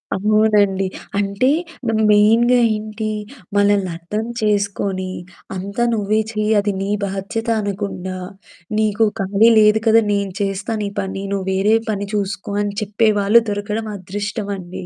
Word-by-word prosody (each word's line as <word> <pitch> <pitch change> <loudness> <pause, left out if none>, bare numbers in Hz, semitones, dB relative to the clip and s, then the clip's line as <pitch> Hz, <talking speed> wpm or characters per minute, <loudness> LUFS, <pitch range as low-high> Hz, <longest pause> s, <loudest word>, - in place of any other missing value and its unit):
అవునండి. 210 -1 +2 0.3
అంటే 200 +5 +1 0.4
ద - - +2 0.2
మెయిన్‌గా 230 +4 +5 0.2
ఏంటి? 215 0 -4 0.5
మనల్ని 205 -2 +3
అర్థం 205 +6 -4 0.2
చేసుకొని, 200 -2 -1 0.5
"అంతా 200 +5 -3
నువ్వే 215 0 +1
చెయి 215 0 -1
అది 205 0 0
నీ 195 - -2 0.2
బాధ్యత" 195 +4 -4
అనకుండా, 195 -2 -4 0.6
"నీకు 215 +1 +2 0.2
ఖాళీ 200 +4 +4
లేదు 210 0 +5
కదా! 225 +1 +6
నేను 200 -1 -1
చేస్తా 195 +3 -2
నీ 200 - -2
పని 195 0 -5
నువ్వు 190 -1 -3
వేరే 200 +3 +3 0.2
పని 200 -1 -3
చూసుకో" 200 0 -3
అని 205 -1 -3
చెప్పేవాాళ్ళు 210 +1 +3
దొరకడం 210 +2 -3
అదృష్టమండి. 200 -1 -5
205 Hz, 125 wpm, -19 LUFS, 195-215 Hz, 0.6 s, కదా